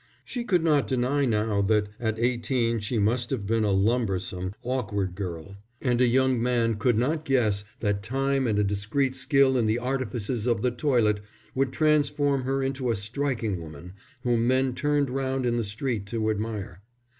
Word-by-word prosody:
She 245 - -4
could 180 -8 +1
not 150 -4 +3
deny 130 +3 +1
now 105 -3 +1
that 105 0 +2
at 110 -2 -1
eighteen 120 0 +1
she 110 +3 -2
must 120 +4 +1
have 125 -7 -2
been 110 +2 +1
a 105 - +1
lumbersome, 95 -3 0
awkward 105 -7 -2
girl; 95 0 -6 0.2
and 125 -2 +1
a 125 - +5
young 130 0 +2
man 115 -2 +1
could 120 +1 +2
not 150 +7 0
guess 110 -8 +1 0.2
that 105 -3 0
time 135 +3 0
and 105 -2 +1
a 105 - +3
discreet 105 +7 0
skill 135 0 +3
in 115 - +1
the 110 +2 +2
artifices 125 -2 -2
of 115 -3 +1
the 125 - +2
toilet 120 -5 +2 0.3
would 135 -1 0
transform 145 -2 +2
her 135 +1 0
into 135 -1 -2
a 115 - +2
striking 110 -2 -2
woman 80 +3 -10 0.3
whom 120 -1 +2
men 130 0 +2
turned 145 -1 0
round 135 -1 -1
in 120 -1 +1
the 115 - 0
street 105 0 -3
to 110 0 0
admire. 105 -4 -4
120 Hz, 180 wpm, -26 LUFS, 105-130 Hz, 0.3 s, a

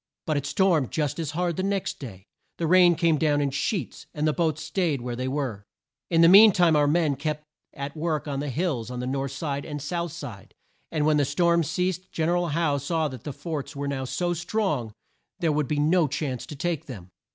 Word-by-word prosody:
But 155 - 0
it 140 -1 -1
stormed 170 - +2
just 150 -1 -2
as 160 -3 -2
hard 175 -2 0
the - - 0
next 195 0 -2
day; 95 -8 -9 0.3
the 170 - -1
rain 175 +1 +6
came 160 -2 +2
down 150 -2 +2
in 140 -1 0
sheets; 145 - -3
and 150 0 0
the 155 - +2
boats 160 -2 0
staid 160 -3 0
where 120 0 -4
they 130 +2 -3
were. 130 -7 -3 0.5
In 165 -1 +3
the 165 - +8
mean 205 +4 +9
time 175 -3 +4
our 145 -1 +4
men 155 -2 +2
kept 150 +2 -3 0.3
at 140 0 -5
work 155 -1 -2
on 140 -1 -2
the 145 0 -3
hills 135 -5 -2
on 125 -1 -5
the 125 - -3
north 135 +1 -2
side 140 -1 -3
and 145 0 -5
south 170 +4 -3
side, 100 -8 -9 0.4
and 155 -2 0
when 155 -1 +4
the 145 - +3
storm 170 +4 +2
ceased 180 +4 -2
Gen 160 0 0
er 175 - +2
al 175 0 +1
Howe 150 -2 +1
saw 155 +2 -1
that 130 -4 -10
the 145 - -3
forts 150 0 -5
were 140 0 -3
now 135 -2 -2
so 175 +6 -1
strong 170 - -1 0.5
there 165 -2 +1
would 150 -2 0
be 150 - -1
no 155 +2 +3
chance 135 -3 -3
to 150 - -7
take 165 +1 -2
them. 95 -9 -9
150 Hz, 230 wpm, -26 LUFS, 140-170 Hz, 0.5 s, mean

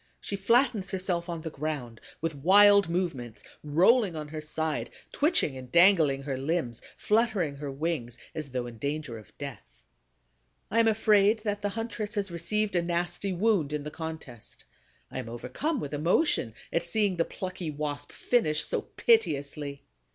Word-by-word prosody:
She 200 - -4
flattens 225 0 +2
herself 180 -2 -2
on 170 -2 -4
the 160 - -5
ground, 140 -6 -4 0.2
with 165 0 -1
wild 200 +6 +6
movements, 165 - -3 0.2
rolling 180 - +4
on 150 -1 -5
her 155 0 -5
side, 155 0 -2 0.2
twitching 290 - +2
and 130 -1 -9
dangling 170 -7 +5
her 135 -2 -3
limbs, 135 -5 -1 0.2
fluttering 210 -10 +1
her 145 0 -5
wings, 135 -4 -3 0.2
as 155 -3 -5
though 125 -1 -3
in 115 -2 -9
danger 140 -4 -3
of 105 - -18
death. - - -9 0.9
I 230 - +3
am 230 - +5
afraid 215 0 +4
that 205 -2 -2
the 205 - 0
huntress 225 -1 -4
has 200 -3 -2
received 200 +5 -1
a 175 - +3
nasty 175 +3 -2
wound 180 -6 +1
in 150 -1 -2
the 150 - -6
contest. 160 -8 -8 0.5
I - - -4
am 115 - -6
overcome 130 - -3
with 145 - -5
emotion 150 - +2 0.2
at 170 - +2
seeing 195 +1 0
the 165 - +3
plucky 185 -3 -5
Wasp 145 -1 -4
finish 155 -11 +1
so - - -1
piteously. 145 - 0
165 Hz, 160 wpm, -28 LUFS, 145-200 Hz, 0.9 s, wild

